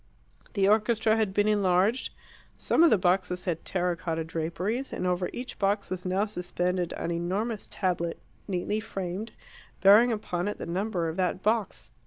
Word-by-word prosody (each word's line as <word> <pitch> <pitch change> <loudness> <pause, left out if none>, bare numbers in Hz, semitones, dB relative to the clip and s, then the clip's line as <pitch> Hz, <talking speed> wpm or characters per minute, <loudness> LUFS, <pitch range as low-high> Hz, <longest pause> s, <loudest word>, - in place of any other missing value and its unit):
The 195 -2 +2
orchestra 220 +1 +3
had 220 -3 +1
been 205 +2 +2
enlarged, 205 +3 +2 0.5
some - - +2
of 340 - +8
the 220 - +5
boxes 180 0 0
had 170 -3 -2
terra 180 -1 0
cotta 165 -1 -3
draperies, 170 +10 -3
and - - -3
over 180 0 0
each 250 +1 -7
box 200 0 0
was 185 0 -3
now 190 +3 +1
suspended 180 -2 -2
an 170 - -3
enormous 195 +6 -2
tablet, 175 -3 -1 0.3
neatly 200 +2 -1
framed, 195 +1 -5 0.5
bearing 210 +6 +7
upon 185 -4 -2
it 205 - -3
the - - -6
number 180 -1 -1
of 160 +2 -4
that 185 0 -1
box. 200 - -1
190 Hz, 165 wpm, -28 LUFS, 175-210 Hz, 0.5 s, of